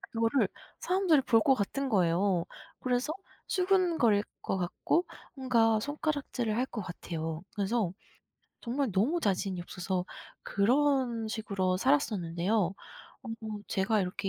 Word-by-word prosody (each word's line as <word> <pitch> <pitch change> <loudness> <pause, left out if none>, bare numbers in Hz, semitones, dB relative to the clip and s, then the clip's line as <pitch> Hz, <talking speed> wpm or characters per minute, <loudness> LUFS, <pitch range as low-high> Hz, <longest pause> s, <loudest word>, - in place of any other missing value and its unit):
그거를 230 +4 +1 0.3
사람들이 360 -5 +3
볼 235 -4 +4
것 270 - +5
같은 265 +5 -2
거예요. 180 -2 +2 0.3
그래서 255 +4 0 0.3
수근거릴 350 - +3 0.2
것 - - -2
같고 190 - 0 0.3
뭔가 230 -5 +3
손가락질을 285 -4 -2
할 250 - +2
것 240 -4 -6
같아요. 165 -3 -5
그래서 205 -2 0 0.7
정말 260 +1 -1
너무 230 - +2
자신이 195 - 0
없어서 180 0 -3 0.4
그런 245 +1 +2
식으로 200 -4 -1
살았었는데요. 195 - +1 0.5
어 250 - -9 0.4
제가 205 +2 +1
이렇게 185 +2 -3
225 Hz, 275 characters per minute, -30 LUFS, 190-270 Hz, 0.7 s, 것